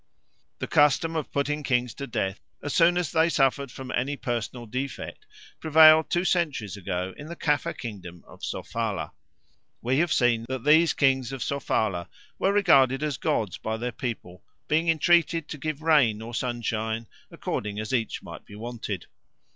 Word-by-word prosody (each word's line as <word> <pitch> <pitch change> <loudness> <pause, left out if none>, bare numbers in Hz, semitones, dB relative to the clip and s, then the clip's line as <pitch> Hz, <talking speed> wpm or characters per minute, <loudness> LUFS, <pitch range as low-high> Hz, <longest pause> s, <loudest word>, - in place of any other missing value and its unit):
The - - -4
custom 150 +3 +3
of 155 -3 -3
putting 150 +1 -1
kings 125 -4 0
to 140 - -6
death 95 -4 -2 0.2
as 145 - -3
soon 175 +1 +4
as 175 -4 -1
they 160 0 +3
suffered 140 -2 +1
from 130 +1 -8
any 140 +4 -1
personal 120 0 -4
defect 135 - -6 0.3
prevailed 160 0 +7
two 175 +1 0
centuries 150 - 0
ago 95 -1 -4
in 150 - -9
the 170 - -7
Caffre 150 -4 0
kingdom 90 -7 -8
of - - -16
Sofala. 105 -9 -3 0.7
We 130 +4 0
have 170 0 +1
seen 120 -2 +2
that 130 -2 -3
these 160 +2 +5
kings 135 -2 +2
of 135 -2 -4
Sofala 105 -10 -1 0.3
were 195 - +2
regarded 140 -9 +4
as 150 -4 -1
gods 105 -5 -1
by 110 0 -3
their 120 +2 -3
people, 115 -8 -6 0.3
being 160 +2 +2
entreated 165 0 +3
to 150 - -6
give 155 +1 -4
rain 140 -10 +4
or 115 +2 -8
sunshine, 115 -2 -2 0.2
according 105 0 -4
as 110 +3 -4
each 115 -3 -1
might - - -10
be 100 - -13
wanted. 110 -4 -5
130 Hz, 165 wpm, -26 LUFS, 115-155 Hz, 0.7 s, prevailed